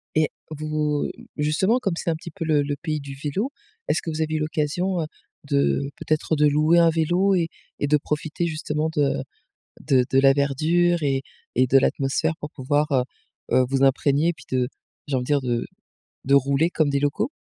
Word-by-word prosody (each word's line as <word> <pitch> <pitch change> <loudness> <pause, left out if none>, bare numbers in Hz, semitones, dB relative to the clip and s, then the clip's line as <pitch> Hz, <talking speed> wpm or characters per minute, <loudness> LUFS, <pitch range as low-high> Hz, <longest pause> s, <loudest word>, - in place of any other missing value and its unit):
Et 155 -1 +3 0.2
vous 150 -1 -1 0.3
justement, 190 +11 +2
comme 195 -8 -1
c'est - - -2
un 160 - +1
petit 170 +1 -9
peu 165 -2 -5
le 150 -2 +3
le 145 0 -2
pays 155 -2 -2
du 140 -1 -8
vélo. 195 - -2 0.4
Est-ce - - +1
que 165 - -5
vous 155 +1 -3
avez 155 0 -1
eu - - 0
l'occasion, 160 +4 -1
heu, - - -1 0.4
de 140 0 +1
peut-être, 155 +1 0
de 150 0 +4
louer 155 +4 +4
un 165 -1 +6
vélo 175 +5 +2
et 170 -2 +1 0.3
et 145 - 0
de 150 +1 +4
profiter, 150 +3 -3
justement, 155 0 -2
de 145 -2 +1 0.6
de 130 -2 +3
de 135 - +4
la 135 0 +6
verdure 160 +5 +2
et 135 -1 +1 0.3
et 130 +1 +3
de 135 - +5
l'atmosphère 135 +3 +1
pour 150 - -6
pouvoir, 145 +2 0
heu 130 -2 +3 0.5
heu, 130 - +4
vous 135 0 +1
imprégner? 140 +5 +3
Puis, - - -16
de 125 -1 +1 0.4
j'ai 140 - -1
envie 125 - 0
de - - -9
dire, 145 -2 +2
de 120 -2 -1 0.6
de 140 +1 +3
rouler 140 +5 +3
comme 155 -4 +1
des 140 0 +1
locaux? 145 - 0
150 Hz, 200 wpm, -23 LUFS, 140-160 Hz, 0.6 s, un